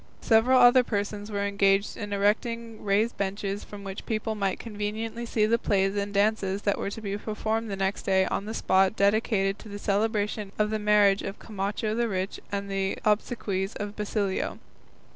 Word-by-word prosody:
Several 245 +3 +4
other 250 +1 +7
persons 205 -1 -3
were 200 -1 -1
engaged 200 0 +2
in 205 -1 -6
erecting 225 +3 -1
raised 210 +3 +1
benches 200 +1 -2
from 205 -1 -10
which 195 0 -7
people 220 0 -1
might 200 -3 -1
conveniently 220 +2 -4
see 215 -2 +2
the 230 +2 +2
plays 195 -1 +1
and 200 0 -2
dances 200 -1 +1
that 205 - +1
were - - -2
to 225 - -7
be 200 -2 -3
performed 220 +1 -2
the 200 - -2
next 195 +1 -1
day 190 -1 +2
on 200 - -2
the 220 +1 -5
spot 190 +2 +3
dedicated 200 -1 +2
to 220 - -11
the 205 - -6
celebration 205 0 -1
of 210 0 +1
the 215 - 0
marriage 210 -1 +4
of 195 - -5
Camacho 210 +1 -3
the 235 +1 +1
rich 190 -1 -3
and 200 0 -2
the 195 -1 -1
obsequies 210 -2 0
of 205 0 -5
Basilio. 205 -2 -2
205 Hz, 180 wpm, -27 LUFS, 200-220 Hz, -, other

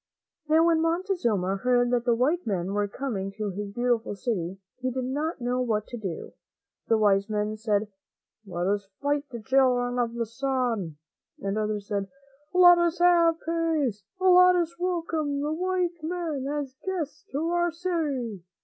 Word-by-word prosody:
Now, 320 +1 +5
when 330 -1 +3
Montezuma 330 - 0
heard 245 +2 +2
that 240 -1 +1
the 240 -2 +3
white 290 +6 +1
men 190 -2 -1
were 205 0 +1
coming 200 -4 -4
to 210 -1 -3
his 200 +2 -5
beautiful 240 -1 0
city, 195 -5 -3 0.2
he 255 0 -1
did 255 +1 -3
not 295 +5 -2
know 250 +1 0
what 215 -4 0
to 240 - -6
do. 190 -7 -6 0.5
Some 225 - +4
of - - +2
his - - -2
wise 200 0 +3
men 210 0 -1
said, 215 -1 0 0.3
" 215 - -50
Let 175 -1 -3
us 200 +1 0
fight 285 +1 0
the 240 -2 -6
Children 250 -1 +2
of 235 -1 -1
the 235 -1 -1
Sun," 230 - -2 0.4
and 195 0 -2
others 210 -1 -2
said, 200 -2 -2 0.4
"Let 355 -1 +7
us 345 0 +1
have 340 -2 +4
peace; 315 -10 0 0.2
let 365 -1 +6
us 340 -1 0
welcome 325 -5 -1
the 295 +2 -1
white 360 0 -1
men 315 -5 -3
as 285 -2 -3
guests 365 -3 -4
to 310 +4 -1
our 345 0 +2
city." 295 - -2
255 Hz, 175 wpm, -27 LUFS, 215-330 Hz, 0.5 s, Let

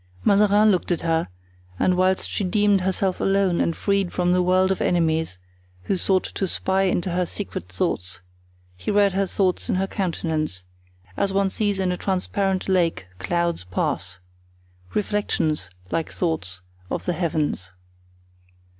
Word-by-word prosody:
Mazarin 210 +1 +5
looked 185 -1 0
at 170 - 0
her, 165 0 +1 0.5
and 180 - +2
whilst 185 +1 +2
she - - -2
deemed 205 0 +3
herself 190 0 0
alone 195 -2 +2
and 165 - +1
freed 200 -3 0
from 180 -1 +1
the 180 0 +3
world 185 +1 +3
of 190 - -1
enemies 160 - +1 0.5
who 195 - 0
sought 185 +1 +2
to 195 - -3
spy 190 +2 0
into 185 -1 0
her 180 +1 +1
secret 175 - -5
thoughts, 90 -1 -2 0.6
he 90 - -6
read 205 -1 +4
her 195 0 +1
thoughts 185 -1 0
in - - +2
her 190 +1 +1
countenance, 160 - -2 0.5
as 195 - +1
one 195 0 +2
sees 205 -1 0
in 190 -1 0
a 180 - -2
transparent 190 0 -1
lake 175 - +1
clouds 170 - -1
pass—reflections, 90 - -3 0.2
like 165 - -1
thoughts, 95 - -2 0.3
of - - -3
the 180 - 0
heavens. 155 - -1
180 Hz, 145 wpm, -23 LUFS, 155-195 Hz, 0.6 s, Mazarin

